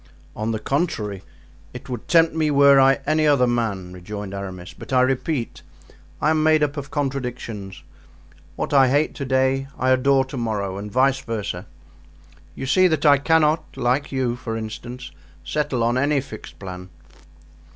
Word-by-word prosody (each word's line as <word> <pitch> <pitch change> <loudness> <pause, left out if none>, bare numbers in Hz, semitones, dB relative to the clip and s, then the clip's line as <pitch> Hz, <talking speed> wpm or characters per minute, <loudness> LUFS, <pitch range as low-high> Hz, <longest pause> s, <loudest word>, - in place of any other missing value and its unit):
"On 110 +1 -3
the 110 - -1
contrary, 110 - -2 0.5
it 125 - -9
would 125 -4 -6
tempt 165 -2 +4
me 160 -1 +1
were 140 -1 +6
I 135 +1 +4
any 155 +1 +2
other 140 -4 +4
man," 110 -7 -2
rejoined 100 +2 -7
Aramis; 95 -3 -7
"but - - -12
I 130 -1 +4
repeat, 130 0 -2 0.6
I 155 - +2
am 155 -1 +2
made 155 -1 +4
up 145 0 -1
of 140 -2 -6
contradictions. 125 -8 -4 0.7
What - - -3
I 135 -2 +6
hate 145 +4 +1
to 140 - -5
day 130 +1 +1
I 130 0 +1
adore 135 +1 +3
to 135 +1 -8
morrow, 100 -5 -2
and 105 +1 -7
vice 135 +2 +3
versa. 115 -5 -4 0.9
You - - -5
see 185 +8 +4
that 160 -4 0
I 140 -2 +6
cannot, 160 +1 +1
like 125 +3 0
you, 130 -3 -1
for 115 -2 -5
instance, 120 +3 -7 0.3
settle 130 - -1
on 120 +2 +1
any 145 +1 +2
fixed 130 -5 -10
plan." 90 -1 -8
130 Hz, 165 wpm, -22 LUFS, 110-145 Hz, 0.9 s, were